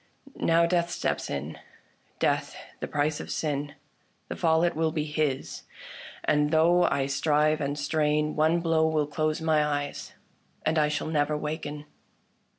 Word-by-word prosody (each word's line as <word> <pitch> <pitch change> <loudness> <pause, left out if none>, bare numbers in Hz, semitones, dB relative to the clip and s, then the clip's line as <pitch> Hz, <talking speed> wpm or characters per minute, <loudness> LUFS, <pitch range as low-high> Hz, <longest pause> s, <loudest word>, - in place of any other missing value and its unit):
Now 165 0 +4
death 170 0 +1
steps - - -2
in 70 +3 -5 0.3
— - - -38
Death - - 0 0.2
the - - -4
price 145 +1 0
of - - -7
sin. 145 -1 -2 0.5
The - - -4
fall 160 0 +2
it 175 0 +1
will 160 0 +1
be 155 -1 -1
his; 150 -3 -2 0.6
and 150 0 +2
though 165 +3 +4
I 135 - +1
strive 150 +2 +1
and 145 +1 -2
strain, 150 +1 0
One 160 +3 +2
blow 165 -1 +2
will 155 -2 +1
close 155 +1 -1
my 155 -2 +3
eyes, 145 -1 -3 0.5
and 155 0 +2
I 150 - +3
shall 150 0 -2
never 150 -1 0
waken." 150 -1 -5
150 Hz, 155 wpm, -27 LUFS, 145-160 Hz, 0.6 s, Now